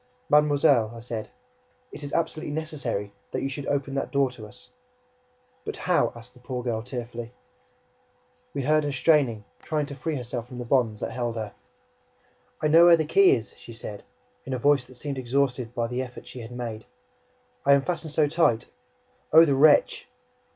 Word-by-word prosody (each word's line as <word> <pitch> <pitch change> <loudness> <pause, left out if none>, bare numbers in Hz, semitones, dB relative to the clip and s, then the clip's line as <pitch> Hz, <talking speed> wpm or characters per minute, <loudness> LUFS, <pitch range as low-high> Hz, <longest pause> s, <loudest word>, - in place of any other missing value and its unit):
"Mademoiselle," 145 -6 +4
I - - -8
said, 115 -2 -6 0.6
"it - - -9
is 145 -1 -6
absolutely 160 -2 -2
necessary, 140 -10 -3 0.2
that - - -3
you 135 - -1
should 140 +1 -6
open 140 -1 -1
that 135 - -2
door 140 -2 +2
to 110 -4 -10
us!" 125 - -14 0.9
"But - - -5
how?" 180 -1 +1
asked 115 -1 -12
the 125 - -18
poor 125 0 -5
girl 115 -3 -1
tearfully. 120 -1 -6 1.2
We 140 - -3
heard 155 +3 +3
her 145 - -1
straining, 135 -6 +2 0.2
trying 150 -2 -1
to 140 - -8
free 160 +2 -3
herself 120 -2 -5
from 125 - -10
the 125 - -5
bonds 115 -4 +1
that - - -3
held 120 -2 -3
her. 110 -2 -5 1.1
"I - - +4
know 165 +3 +7
where 170 -1 +8
the 160 - 0
key 185 +1 +5
is," 115 -3 -6
she 115 - -11
said, 105 -2 -8 0.4
in 135 - -5
a - - 0
voice 135 0 +2
that 130 - -14
seemed 140 +2 -4
exhausted 125 -1 -1
by 120 - 0
the 125 +2 -2
effort 125 -1 -8
she 125 - -10
had 115 -1 -8
made. 115 -3 -6 0.8
"But - - -2
I - - +9
am 140 - +1
fastened 170 -2 -3
so 150 0 +3
tight... 145 -7 +2 0.7
Oh, 160 +2 +9
the 145 - +2
wretch!" 145 +2 +4
130 Hz, 190 wpm, -26 LUFS, 120-145 Hz, 1.2 s, I